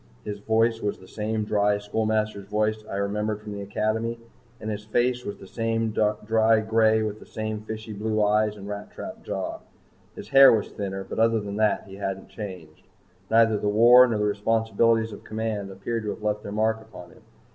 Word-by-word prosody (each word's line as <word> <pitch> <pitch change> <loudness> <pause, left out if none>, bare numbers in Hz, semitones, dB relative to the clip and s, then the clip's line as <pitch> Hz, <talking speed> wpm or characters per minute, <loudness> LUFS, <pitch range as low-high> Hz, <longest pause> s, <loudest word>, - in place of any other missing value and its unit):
His 105 -1 -5
voice 115 +2 +1
was 105 - -2
the 95 - -16
same 110 +2 -2
dry 105 -1 +2
schoolmaster's 110 -1 -1
voice 110 +1 0
I - - -4
remembered 105 +1 -1
from 105 - -8
the 100 0 -5
Academy. 110 +3 -1 0.4
And 110 0 -4
his 105 0 -5
face 120 +3 0
was 100 - -5
the - - -12
same 115 +1 -1
dry 110 +1 +2
gray 110 0 +3
with 105 0 -4
the - - -13
same 110 -1 -4
fishy 110 0 -7
blue 110 +1 -1
eyes 105 0 +2
and 100 0 -9
rat 105 0 -6
trap - - -8
jaw. - - -4 0.6
His - - -9
hair 135 0 +9
was 110 -2 -1
thinner, 95 -1 -4
but 95 - -6
other 115 0 +3
than 100 -1 -5
that 105 -2 +2
he 95 0 -11
hadn't 95 -1 -4
changed. 95 -6 -9 0.4
Neither 115 -1 +4
the 105 - 0
war 120 +4 +7
nor 115 -3 -1
the 105 - 0
responsibilities 110 +1 +1
of - - -10
command 110 -2 -3
appeared 100 +5 -4
to - - -2
have 105 - -6
left 105 0 0
their 100 - -7
mark 110 +1 0
upon 110 -6 -12
him. - - -19
110 Hz, 200 wpm, -25 LUFS, 105-110 Hz, 0.6 s, hair